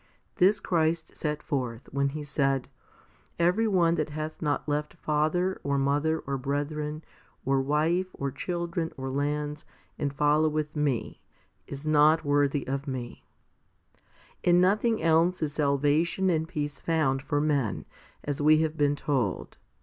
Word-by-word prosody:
This 195 +3 +4
Christ 160 -1 0
set 150 -1 -3
forth, 125 -4 -3
when 140 0 +1
He 150 +2 -5
said, 135 -2 0 0.4
" - - -32 0.3
Every 180 +7 +3
one 175 -5 +3
that 155 - -3
hath 155 +1 -5
not 150 -1 -1
left 150 +2 -2
father, 160 +4 0
or 140 0 0
mother, 145 +4 +1
or 135 -1 -2
brethren, 150 +3 -3 0.4
or 135 0 +2
wife, 155 +6 +1
or 140 0 -3
children, 170 +3 -3
or 135 0 -4
lands, 150 +2 -2 0.4
and 140 - -1
followeth 150 +1 +1
Me, 145 -5 -1 0.5
is 140 +2 -8
not 155 +1 +4
worthy 145 0 +2
of 140 +2 -3
Me." 125 -3 -5 1.2
2 - - +1
In 175 0 +6
nothing 215 +5 +2
else 165 +3 +3
is 150 -2 -2
salvation 150 +5 +2
and 160 -1 0
peace 150 -4 -4
found 155 -5 +1
for 145 +1 -1
men, 145 -7 0 0.4
as 145 0 -3
we 155 +1 +5
have 160 -1 -1
been 145 -1 +2
told. 130 -9 -2
150 Hz, 150 wpm, -28 LUFS, 140-160 Hz, 1.2 s, In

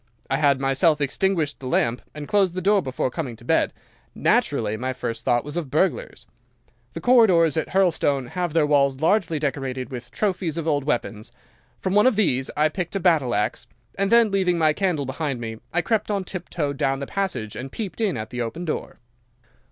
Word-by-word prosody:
I 135 - +2
had 140 -2 +3
myself 135 +3 +2
extinguished 155 +2 0
the 130 - -7
lamp 120 -1 +1
and 150 -1 -7
closed 195 -4 +2
the - - -1
door 200 +1 +4
before 130 -3 -2
coming 130 -6 -4
to 120 - -16
bed. - - +2 0.4
Naturally 105 - +1
my 130 +3 -3
first 115 -2 -5
thought 120 -2 +2
was 150 +3 -5
of 160 -6 -3
burglars. 190 - -1 0.7
The - - -6
corridors 190 - +5
at 160 - -1
Hurlstone 150 -9 +1
have 175 -1 -3
their 165 -2 +3
walls 140 -2 +2
largely 165 0 +2
decorated 135 -3 -3
with 125 -1 -7
trophies 185 -6 -1
of 165 -1 -3
old 145 -3 +1
weapons. 120 -6 -2 0.5
From 190 - -2
one 210 +4 +5
of 255 - +3
these 135 -11 +1
I 150 +1 +4
picked 175 +3 -4
a - - +1
battle 160 - +2
axe, 105 +1 -2 0.3
and 195 0 0
then, 235 -2 +5
leaving 185 -3 +1
my 155 -2 +3
candle 175 -6 0
behind 135 -1 -3
me, 115 -1 -5
I 175 0 0
crept 215 +3 0
on 200 -2 0
tiptoe 175 -5 -4
down 135 0 0
the 140 - -4
passage 175 - -3
and 135 +1 -6
peeped 220 0 -5
in 200 - +1
at 110 0 -6
the 125 0 -3
open 120 +10 -4
door. 155 - -4
155 Hz, 200 wpm, -23 LUFS, 130-185 Hz, 0.7 s, corridors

